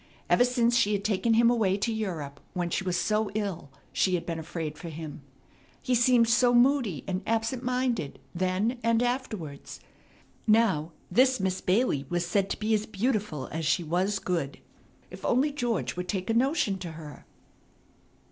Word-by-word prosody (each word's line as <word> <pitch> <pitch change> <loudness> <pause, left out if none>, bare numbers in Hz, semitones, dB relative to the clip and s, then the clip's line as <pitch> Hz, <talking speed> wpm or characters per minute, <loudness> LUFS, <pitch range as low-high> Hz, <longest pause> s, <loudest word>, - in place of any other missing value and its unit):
Ever 245 - +6
since 240 -1 +2
she 210 -3 +3
had 200 -1 -1
taken 220 +2 +1
him 235 +1 +5
away 205 -5 +2
to 225 +3 -1
Europe, 165 -10 -4
when 175 -1 -2
she 195 - -1
was 180 -2 0
so 215 +3 +1
ill, 195 -9 -3 0.2
she 185 -1 +2
had 170 - -3
been 165 -1 -3
afraid 160 -1 -5
for 165 +2 -8
him. 155 -2 -7 0.6
He 255 - -1
seemed 240 -1 +4
so 245 +1 +4
moody 240 - +3
and 185 0 -2
absent 225 +2 0
minded 250 - -1 0.2
then 185 +7 0
and 230 +1 +2
afterwards. 215 - -4 0.7
Now 210 -8 +3 0.2
this 255 +5 +4
Miss 190 -1 -1
Bailey 180 - +1
was 175 0 0
said 195 +2 0
to - - -2
be 220 +1 0
as 215 0 0
beautiful 210 - -1
as 160 +1 -3
she 170 +3 +1
was 185 +6 0
good. 165 -7 -2 0.5
If - - -10
only 270 +5 +2
George 245 -5 -2
would 180 0 -4
take 185 +2 -2
a - - +1
notion 235 - +1
to 175 -3 -6
her! 155 -2 -11
205 Hz, 175 wpm, -28 LUFS, 175-235 Hz, 0.7 s, Ever